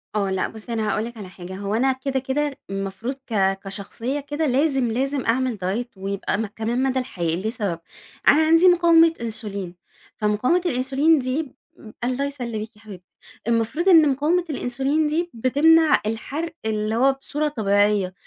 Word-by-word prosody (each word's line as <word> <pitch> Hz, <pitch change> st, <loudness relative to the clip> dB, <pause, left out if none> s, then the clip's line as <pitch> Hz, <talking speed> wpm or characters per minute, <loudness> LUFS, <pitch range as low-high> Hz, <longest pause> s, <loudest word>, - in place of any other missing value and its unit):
آه، 200 Hz, -2 st, 0 dB
لأ 190 Hz, -1 st, 0 dB
بُصّي، 220 Hz, +2 st, -8 dB
أنا 215 Hz, -1 st, -1 dB
هاقول 215 Hz, +2 st, 0 dB
لِك 235 Hz, -1 st, -9 dB
على 195 Hz, -3 st, -8 dB
حاجة 185 Hz, 0 st, -9 dB
هو 200 Hz, +2 st, -3 dB
أنا 260 Hz, +3 st, +2 dB
كده، 265 Hz, +1 st, -2 dB
كده، 275 Hz, +2 st, -2 dB
المفروض 195 Hz, +5 st, -4 dB
ك 195 Hz, -4 st, +1 dB
كشخصية 205 Hz, +8 st, -4 dB
كده 290 Hz, +2 st, -3 dB
لازم، 270 Hz, -2 st, +1 dB
لازم 270 Hz, +3 st, -1 dB
أعمل 250 Hz, 0 st, +1 dB
diet 230 Hz, +3 st, -3 dB
ويبقى 195 Hz, +1 st, -2 dB
م 220 Hz, -, -1 dB
كمان 225 Hz, +5 st, -2 dB
مدى 260 Hz, -1 st, +1 dB
الحياة 170 Hz, -9 st, -2 dB
لسبب، 200 Hz, -3 st, -3 dB, 0.5 s
أنا 300 Hz, -, +7 dB
عندي 330 Hz, +3 st, +5 dB
مقاومة 335 Hz, -2 st, +6 dB
انسولين، 200 Hz, -5 st, -5 dB, 0.4 s
فمقاومة 215 Hz, +12 st, +1 dB
الانسولين 275 Hz, +3 st, +2 dB
دي 255 Hz, +5 st, -1 dB
ب 265 Hz, -, -15 dB, 0.5 s
الله 255 Hz, +3 st, 0 dB
يسلِّمِك 235 Hz, -5 st, -5 dB
يا 210 Hz, -, -20 dB
حبيبتي، 190 Hz, -5 st, -12 dB, 0.4 s
المفروض 235 Hz, -, +1 dB
إن 320 Hz, -4 st, +7 dB
مقاومة 315 Hz, +6 st, +1 dB
الانسولين 275 Hz, +3 st, 0 dB
دي 335 Hz, +3 st, -1 dB
بتمنع 305 Hz, +7 st, +4 dB
الحرق 295 Hz, +9 st, -4 dB
اللي 215 Hz, 0 st, -1 dB
هو 270 Hz, +3 st, +4 dB
بصورة 290 Hz, +3 st, -3 dB
طبيعيّة، 205 Hz, -6 st, +1 dB
245 Hz, 160 wpm, -23 LUFS, 210-285 Hz, 0.5 s, أنا